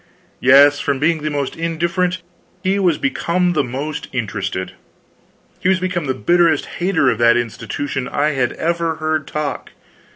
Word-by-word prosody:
Yes; 140 +3 +6
from 140 -1 -1
being 155 +3 +1
the 155 - -2
most 145 -2 -3
indifferent, 170 +2 -1 0.4
he 195 +1 +1
was 175 -6 +2
become 175 +6 0
the 155 - +1
most 135 +5 -5
interested. 100 -6 -3 0.9
He 185 - +1
was 190 -1 +3
become 180 -3 -2
the 130 -1 -1
bitterest 170 0 +2
hater 175 -7 +2
of - - -3
the 120 0 +5
institution 120 +3 -3
I 150 +1 0
had 130 -5 0
ever 170 0 -1
heard 155 -2 -2
talk. 150 -1 -4
155 Hz, 155 wpm, -19 LUFS, 135-170 Hz, 0.9 s, Yes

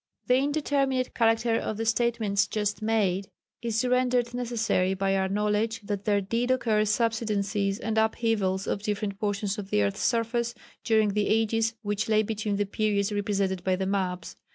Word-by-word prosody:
The 250 - +4
indeterminate 275 -2 0
character 225 0 +2
of 215 - -4
the 225 - -2
statements 220 -4 +1
just 210 0 -2
made 200 -4 0 0.3
is 230 0 0
rendered 250 -1 +1
necessary 230 -6 0
by 195 0 0
our 190 0 0
knowledge 210 +2 0
that 200 -1 -4
there 205 -1 +2
did 230 +5 -1
occur 225 -5 +2
subsidences 210 -3 0
and 220 -2 0
upheavals 220 -4 0
of 200 - -2
different 205 -1 -3
portions 205 -1 -1
of 195 -1 -7
the 105 - +2
earth's 100 -1 -2
surface 235 0 0 0.3
during 220 -2 +3
the 205 0 0
ages 225 +1 +1
which 205 +1 -2
lay 215 0 +4
between 210 -1 -2
the 205 +1 0
periods 205 0 0
represented 200 -3 -1
by 185 0 +2
the 190 +1 -2
maps. 185 -3 -2
215 Hz, 165 wpm, -27 LUFS, 200-230 Hz, 0.3 s, The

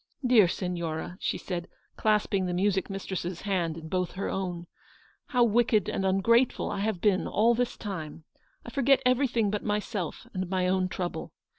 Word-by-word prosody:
" - - -9
Dear 235 -6 +6
Signora," 170 -2 -3
she - - -1
said, 175 -2 -4 0.3
clasping 205 -3 +1
the 175 - -2
music 190 0 +1
mistress's 190 -3 -4
hand 175 -5 -1
in 160 -1 -8
both 180 +1 -1
her 195 - -3
own, 180 -3 -3
u 170 - -14 0.6
how 250 -3 +3
wicked 230 -2 +3
and 195 - -1
ungrateful 230 +6 +2
I - - -3
have 205 -3 -1
been 200 -3 +2
all 230 +3 +3
this 245 +1 -1
time! 165 -7 -6 0.4
I - - -8
forget 275 -1 +3
everything 250 -5 +2
but 210 - -2
myself 205 -4 -3
and 185 -1 -3
my 185 -1 +1
own 185 0 +2
trouble. 180 -1 -4
195 Hz, 175 wpm, -28 LUFS, 180-220 Hz, 0.6 s, Dear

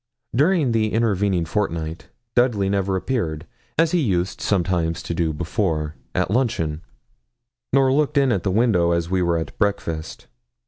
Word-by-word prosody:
During 150 -1 +3
the 110 -1 +1
intervening 100 -6 +1
fortnight 80 -3 -3 0.3
Dudley 115 -6 +2
never 100 -1 0
appeared, 90 -7 -2 0.3
as 165 0 +3
he 180 - +2
used 95 - 0
sometimes 85 -4 0
to - - -3
do 80 -1 0
before, 80 -1 -1 0.2
at 90 +1 0
luncheon, 105 -11 0 0.9
nor 135 0 +4
looked 150 0 +1
in 135 -2 +4
at 95 - +1
the 95 - -1
window 95 -5 +3
as 85 +1 -1
we 95 -1 +2
were 85 -1 +2
at 80 -3 -5
breakfast. 100 -7 -2
95 Hz, 150 wpm, -22 LUFS, 85-115 Hz, 0.9 s, nor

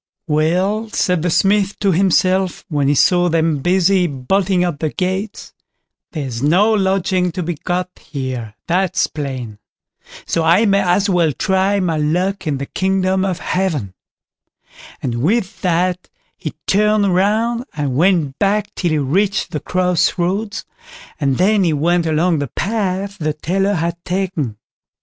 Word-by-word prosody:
"Well!" 180 +8 0
said 180 -4 0
the 175 - 0
Smith 200 +3 +2
to 200 -2 +1
himself, 185 0 +1
when 145 -3 0
he 145 - +3
saw 175 +4 +3
them 160 -2 +1
busy 180 +3 +2
bolting 180 +7 0
up 170 -5 -2
the 155 - -1
gates, 190 +5 -4 0.6
"there's 130 -7 -4
no 185 +10 +3
lodging 190 -2 +1
to 180 - -3
be 175 +2 -2
got 180 +4 -2
here, 130 -7 -5
that's 185 0 +1
plain; 130 -8 -6 0.7
so 165 - 0
I 170 +7 +4
may 200 -1 +3
as 190 +2 +2
well 175 -5 +2
try 190 +6 +1
my 170 -4 0
luck 180 +5 -1
in 145 -3 0
the 140 - -4
kingdom 190 +2 0
of 190 -3 -1
Heaven"; 165 - -2 1.1
and 120 -2 -2
with 195 - 0
that 180 0 0 0.3
he - - -6
turned 210 -1 +2
round 225 +6 +1
and 145 -4 -2
went 165 -4 +2
back 205 +1 0
till 175 - -1
he 155 - +1
reached 190 +9 0
the 150 - -2
cross 180 +3 +1
roads, 200 +5 -2 0.5
and 140 -3 +1
then 200 +2 +3
he 165 -3 +2
went 170 +3 +1
along 160 +1 +1
the 140 - -2
path 200 - -2
the 155 -1 -1
tailor 195 +6 0
had 170 +1 -3
taken. 175 - -2
180 Hz, 150 wpm, -18 LUFS, 155-195 Hz, 1.1 s, I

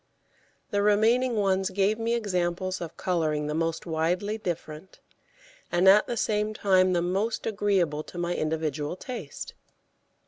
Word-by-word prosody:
The 205 - +1
remaining 225 +4 +3
ones 195 -2 +1
gave 200 +3 +1
me 230 +1 0
examples 185 -4 -1
of 165 -2 -7
colouring 155 -5 0
the 150 - -2
most 165 +1 -1
widely 175 +6 0
different, 175 -4 -6 0.7
and 175 +2 +3
at 205 +2 +7
the 240 - -3
same 215 0 0
time 185 -3 +3
the 170 -1 +1
most 195 +6 -1
agreeable 195 -8 +1
to - - -11
my 175 0 -1
individual 155 -1 -2
taste. 195 - -7
185 Hz, 140 wpm, -27 LUFS, 165-210 Hz, 0.7 s, at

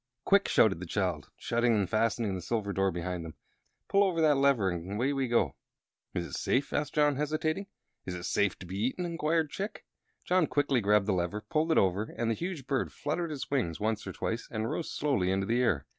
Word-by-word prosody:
"Quick!" 200 0 +4
shouted 95 -6 +4
the 90 - -6
child, 90 -6 -1
shutting 120 0 +1
and 100 -3 +1
fastening 110 0 +1
the 95 - -4
silver 100 +1 -2
door 95 0 +2
behind 90 0 -3
them. 80 -1 -8 0.5
"Pull 200 0 +4
over 185 -4 +1
that 155 -2 +5
lever, 135 -7 +3
and 90 +3 -5
away 125 +7 +1
we 135 -2 0
go!" 110 - +2 0.6
"Is 85 - -1
it - - -10
safe?" 135 +3 0
asked 145 -1 -1
John, 145 -2 +3
hesitating. 155 +6 -1 0.4
"Is 90 - -3
it 90 - -6
safe 95 +1 +1
to - - -10
be 95 +3 -5
eaten?" 130 +9 -1
inquired 165 -2 0
Chick. 205 +2 -5 0.4
John 180 -3 +3
quickly 140 -4 +1
grabbed 105 0 +3
the 105 - +1
lever, 90 +4 -1
pulled 160 +4 0
it - - +3
over, 95 +3 +3
and 115 -1 0
the - - +2
huge 170 - -4
bird 135 -1 -1
fluttered 160 +3 -2
its 140 -2 -5
wings 110 - 0
once 110 0 -1
or - - -3
twice 115 +1 -3
and 110 0 -2
rose 165 - -3
slowly 135 -11 +1
into 95 +1 +1
the 120 +4 +1
air. 90 - +1
115 Hz, 220 wpm, -30 LUFS, 95-150 Hz, 0.6 s, that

